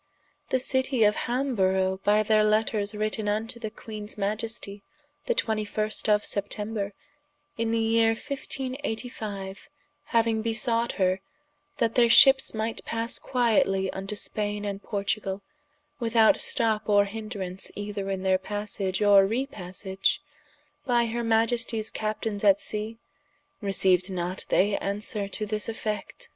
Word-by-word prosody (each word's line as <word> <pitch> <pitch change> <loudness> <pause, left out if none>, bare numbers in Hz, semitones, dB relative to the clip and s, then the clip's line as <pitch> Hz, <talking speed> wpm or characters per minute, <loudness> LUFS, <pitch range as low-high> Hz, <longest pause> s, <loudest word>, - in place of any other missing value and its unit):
The - - +2
Citie 260 -1 +1
of 210 0 +4
Hamborough 190 -7 0
by 210 +1 +4
their 215 0 +4
letters 215 -1 +1
written 215 0 -1
vnto 225 +3 -2
the 220 - -3
Queenes 215 -1 -6
Maiestie, 210 0 -3 0.5
the 485 - +1
21. 215 - -1 0.2
of 210 -1 +3
September, 205 0 -2 0.6
in 230 0 -1
the 230 - +1
yeere 225 0 +3
1585 245 -7 -5 0.4
hauing 230 -2 +2
besought 230 +1 0
her, 185 -1 +1 0.6
that 230 -2 +1
their 235 -1 +4
ships 265 0 +7
might 220 +1 -3
passe 230 +1 -1
quietly 205 -6 +2
vnto 195 +2 -5
Spaine 210 0 -1
and 200 -1 -4
Portugal, 200 -1 -2 0.6
without 230 +1 +4
stop 220 -3 0
or 205 -1 +5
hindrance 200 -3 -5
either 205 -1 -4
in 190 -1 -2
their 190 -1 +3
passage 205 -1 -2
or 200 -1 +6
repassage, 195 -5 -1 0.6
by 240 -2 +2
her 235 +1 -2
Maiesties 230 0 +1
Captaines 215 -1 -3
at 200 -1 +5
Sea, 215 +2 -4 0.6
receiued 190 -2 +2
not 180 0 -4
they 200 +2 +3
answere 200 +1 -2
to 215 - -2
this 210 +1 -1
effect? 225 - -5
215 Hz, 125 wpm, -27 LUFS, 200-230 Hz, 0.6 s, ships